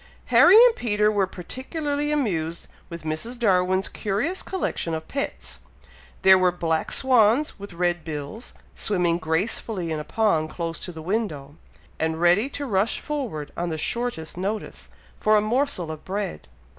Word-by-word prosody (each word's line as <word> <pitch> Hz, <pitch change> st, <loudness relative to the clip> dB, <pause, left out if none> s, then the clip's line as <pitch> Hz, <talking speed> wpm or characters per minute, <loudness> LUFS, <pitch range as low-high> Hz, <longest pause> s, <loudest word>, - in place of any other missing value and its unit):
Harry 300 Hz, -, +8 dB
and 480 Hz, -2 st, +4 dB
Peter 210 Hz, -2 st, +1 dB
were 200 Hz, -3 st, +1 dB
particularly 285 Hz, -, -4 dB
amused 170 Hz, -, -1 dB, 0.2 s
with 170 Hz, -2 st, -8 dB
Mrs. 160 Hz, +11 st, -3 dB
Darwin's 185 Hz, -4 st, +2 dB
curious 215 Hz, -, -2 dB
collection 175 Hz, -, -2 dB
of 160 Hz, 0 st, -6 dB
pets. 60 Hz, -, -5 dB, 0.6 s
There 190 Hz, 0 st, +8 dB
were 180 Hz, -1 st, +4 dB
black 165 Hz, -2 st, -1 dB
swans 250 Hz, +1 st, +3 dB
with 200 Hz, -2 st, -9 dB
red 175 Hz, -1 st, 0 dB
bills, 155 Hz, +8 st, -7 dB, 0.2 s
swimming 175 Hz, -4 st, 0 dB
gracefully 170 Hz, +2 st, -1 dB
in 155 Hz, -, -2 dB
a -, -, -4 dB
pond 165 Hz, -6 st, +1 dB
close 165 Hz, -1 st, -4 dB
to 180 Hz, -, -6 dB
the 160 Hz, -2 st, -9 dB
window, 160 Hz, -8 st, -3 dB, 0.4 s
and 160 Hz, 0 st, -1 dB
ready 175 Hz, +9 st, +4 dB
to 285 Hz, 0 st, -5 dB
rush 205 Hz, -2 st, +1 dB
forward 240 Hz, -, -4 dB
on 175 Hz, 0 st, -2 dB
the 160 Hz, -, -3 dB
shortest 205 Hz, -4 st, -2 dB
notice, 205 Hz, +4 st, -4 dB, 0.3 s
for 215 Hz, 0 st, +4 dB
a -, -, +5 dB
morsel 215 Hz, -, 0 dB
of 155 Hz, -, -8 dB
bread. 185 Hz, -, -4 dB
190 Hz, 155 wpm, -24 LUFS, 165-230 Hz, 0.6 s, Harry